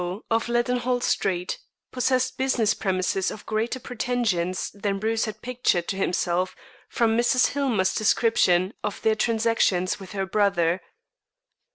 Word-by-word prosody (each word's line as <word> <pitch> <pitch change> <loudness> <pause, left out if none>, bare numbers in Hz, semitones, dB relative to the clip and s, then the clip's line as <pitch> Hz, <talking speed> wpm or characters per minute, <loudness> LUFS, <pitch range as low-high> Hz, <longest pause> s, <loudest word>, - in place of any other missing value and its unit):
of 225 +1 +1
Leadenhall 245 +1 +1
Street, 180 -6 -1 0.3
possessed 255 0 +1
business 260 -5 +1
premises 190 -1 0
of 210 - -9
greater 225 +4 -1
pretensions 220 -8 -1
than 200 -1 -2
Bruce 220 +3 0
had 215 -3 -7
pictured 240 -8 0
to - - -1
himself 185 -1 0 0.3
from 230 -3 +1
Mrs. 240 +2 +3
Hillmer's 235 -10 +1
description 195 -4 +2
of 205 - -3
their 220 -1 +4
transactions 220 -5 +1
with 195 +1 -10
her 195 -1 -1
brother. 190 -3 +1
215 Hz, 130 wpm, -25 LUFS, 190-240 Hz, 0.3 s, their